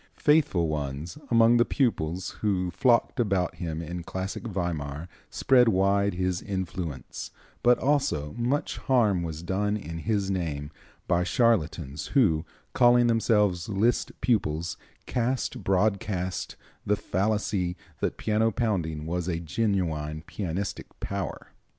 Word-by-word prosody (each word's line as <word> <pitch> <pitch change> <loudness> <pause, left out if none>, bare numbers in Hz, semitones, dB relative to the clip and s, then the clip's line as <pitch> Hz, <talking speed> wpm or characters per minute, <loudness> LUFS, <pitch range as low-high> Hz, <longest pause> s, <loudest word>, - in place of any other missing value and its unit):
Faithful 150 - +3
ones 75 - -4
among 115 0 +5
the 120 - +6
pupils 95 - -1
who 90 -4 0
flocked 120 +5 +2
about 95 -6 +1
him 85 -1 -4
in 85 +2 -5
classic 95 +6 -5
Weimar 85 -6 -3 0.2
spread 125 -2 +4
wide 100 0 +2
his 90 -1 -1
influence, 90 -8 -5 0.3
but 120 0 +5
also 135 - 0
much 120 +5 -1
harm 110 -9 +2
was 80 -1 -5
done 105 +3 0
in 85 -4 -6
his 100 0 0
name 75 -5 -3 0.4
by 85 +1 +2
charlatans 85 - +1
who, 80 - +4 0.3
calling 120 -1 +5
themselves 105 -6 +2
Liszt 110 +4 +1
pupils, 90 -9 0 0.3
cast 125 +1 -1
broadcast 95 -1 0 0.3
the 105 - +2
fallacy 100 -2 -1 0.2
that - - -1
piano 110 +1 +2
pounding 85 -9 -1
was 85 +1 -2 0.2
genuine 80 -5 -1
pianistic 95 +2 -5
power. 100 -1 -4
95 Hz, 120 wpm, -27 LUFS, 85-110 Hz, 0.4 s, the